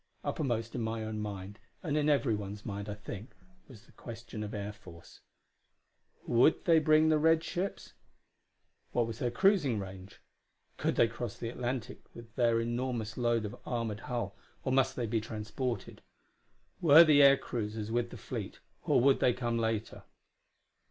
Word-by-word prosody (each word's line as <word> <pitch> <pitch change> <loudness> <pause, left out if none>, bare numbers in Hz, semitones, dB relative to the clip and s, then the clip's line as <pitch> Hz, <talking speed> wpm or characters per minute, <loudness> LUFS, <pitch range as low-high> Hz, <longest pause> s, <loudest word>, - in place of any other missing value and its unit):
Uppermost 115 -6 -2
in 120 - -3
my 110 0 -2
own 110 0 -4
mind, 105 -1 -6 0.2
and 150 -4 -1
in 150 0 +2
everyone's 105 -8 0
mind, 100 -1 -5
I 105 - -4
think, 105 +2 -9 0.3
was 115 -5 -14
the - - -21
question 115 -2 -9
of 105 -1 -4
air 105 -1 -4
force. 90 -5 -15 1.1
Would 120 +6 +3
they 165 -2 +6
bring 155 +1 +4
the 155 -1 +4
red 160 +1 +4
ships? 180 +4 -4 1.0
What 120 - +2
was 115 0 -6
their 125 - 0
cruising 150 - +3
range? 95 -1 -8 0.6
Could - - 0
they 115 - +5
cross 115 -1 -6
the 115 - -4
Atlantic 125 0 -4 0.2
with 115 -1 -12
their 115 -2 +3
enormous 120 -2 -2
load 120 -2 +1
of 105 - -6
armored 115 -4 -3
hull, 120 0 -4 0.3
or 130 - -1
must 130 0 +2
they 120 - -2
be 110 0 0
transported? 115 +3 -4 0.8
Were 160 0 +9
the 150 -3 +6
air 140 0 +8
cruisers 110 -3 -4
with 120 0 0
the - - -9
fleet, - - -6 0.2
or - - +3
would 135 +2 +4
they 125 - +3
come 120 -1 -1
later? 110 -1 -2
115 Hz, 165 wpm, -31 LUFS, 110-130 Hz, 1.1 s, Were